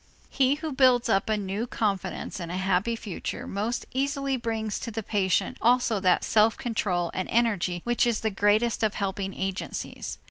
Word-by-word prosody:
He 270 +1 +3
who 310 +1 -5
builds 255 -3 +4
up 195 0 +2
a 215 - +2
new 205 +3 -3
confidence 205 -3 -2
in 170 -2 -5
a 180 - -3
happy 190 +4 +1
future 210 -5 -5
most 215 +5 -2
easily 275 0 0
brings 225 -3 -2
to - - -5
the 225 0 -4
patient 195 -3 0
also 240 -2 +3
that 185 -2 +3
self 220 0 +3
control 185 -7 -1
and 185 - -3
energy 200 -7 +1
which 240 0 +2
is 235 -2 0
the 220 - 0
greatest 210 +4 +2
of 215 -2 +1
helping 195 -1 -2
agencies. 190 0 -4
220 Hz, 175 wpm, -27 LUFS, 195-240 Hz, -, builds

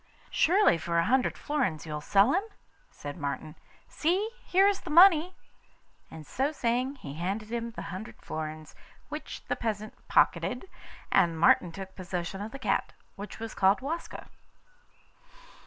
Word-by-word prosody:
'Surely 365 - +4
for 170 0 -1
a 170 - +3
hundred 255 +2 +2
florins 250 - -1
you'll 150 -1 -5
sell 200 - +4
it?' 405 +5 -1 0.4
said 145 0 -8
Martin. 145 0 -4 0.3
'See! 375 +8 0
here 385 +2 +4
is 400 -1 +1
the - - -9
money;' 345 +1 +6 0.7
and, 155 -1 -10
so 270 - -1
saying, 255 0 -1
he 140 - -9
handed 195 +7 -3
him 235 0 -2
the 230 - -8
hundred 200 +5 -8
florins, 155 0 -6 0.4
which - - -7
the - - 0
peasant 215 -2 -3
pocketed, 250 +9 +2 0.4
and 170 -4 +3
Martin 170 +1 +5
took 190 +2 -9
possession 185 0 -4
of 215 +2 -5
the 275 - -7
cat, 265 - -1 0.2
which 205 0 -8
was 225 0 -6
called 195 +1 +3
Waska. 320 +6 -5
215 Hz, 150 wpm, -29 LUFS, -, 0.7 s, money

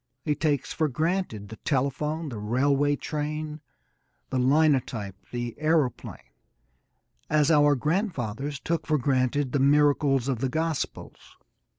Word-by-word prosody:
He 150 - +2
takes 145 -3 -1
for 155 - +1
granted 155 - -2
the 110 - -9
telephone, 150 +3 -1
the 115 -5 -6
railway 140 +6 +2
train, 150 +1 -4 0.7
the 130 - 0
linotype, 130 -7 +2
the 120 -1 -4
aeroplane, 155 -5 -1 1.0
as 150 0 +3
our 145 -2 +5
grandfathers 140 - -2
took 165 +1 -2
for 155 - +2
granted 130 0 +1
the 140 - +1
miracles 140 -1 +3
of 130 -4 -1
the 135 +1 0
gospels. 160 +1 -4
145 Hz, 120 wpm, -26 LUFS, 130-155 Hz, 1.0 s, our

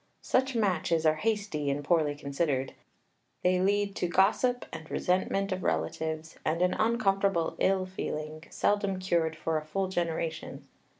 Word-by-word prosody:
Such 260 0 +1
matches 170 -6 +1
are 155 0 +4
hasty, 205 -8 -1
and 140 +1 -1
poorly 150 -2 +2
considered. 140 -2 -1 0.7
They 180 0 +3
lead 200 +1 +1
to 180 - 0
gossip 215 +8 +2
and 160 -1 -8
resentment 195 +2 0
of 185 0 -2
relatives, 160 -1 -2
and 165 +3 +1
an 180 - +2
uncomfortable 195 -6 +1
ill 190 -1 +2
feeling, 155 -4 -5
seldom 200 -2 +1
cured 170 -4 0
for 160 0 -1
a - - -10
full 190 +4 -1
generation. 165 -3 -3
180 Hz, 140 wpm, -29 LUFS, 155-195 Hz, 0.7 s, are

